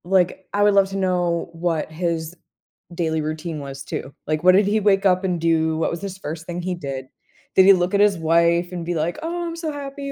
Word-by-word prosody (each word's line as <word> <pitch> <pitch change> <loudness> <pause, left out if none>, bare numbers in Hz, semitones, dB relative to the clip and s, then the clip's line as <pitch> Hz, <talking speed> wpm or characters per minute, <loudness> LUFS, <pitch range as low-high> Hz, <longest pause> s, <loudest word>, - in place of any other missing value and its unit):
Like, 185 0 +1
I 205 +1 +2
would 205 0 +5
love 195 -1 +4
to 195 - -4
know 180 -3 0
what 165 -2 -2
his 165 0 -3 0.6
daily 160 -2 -1
routine 155 +1 -4
was 135 -1 -7
too, 140 0 -6
like, 155 +1 -1
what 185 0 +7
did 200 +2 +5
he 215 +2 +2
wake 200 -1 +2
up 185 0 +3
and 180 -3 -1
do, 160 -1 +2
what 160 - 0
was 170 - -5
his 195 -2 -6
first 165 -2 -6
thing 175 0 -5
he 180 +1 -2
did? 135 -5 -6 0.5
Did 190 - +7
he 195 - +9
look 180 0 0
at 200 - +3
his 205 -2 +4
wife, 170 +2 +2
and 175 -2 -4
be 175 +1 -2
like, 165 +2 -1
"Oh, 345 +1 -3
I'm 335 - -5
so 330 -2 -4
happy," 280 -1 -6
175 Hz, 235 wpm, -22 LUFS, 160-195 Hz, 0.6 s, he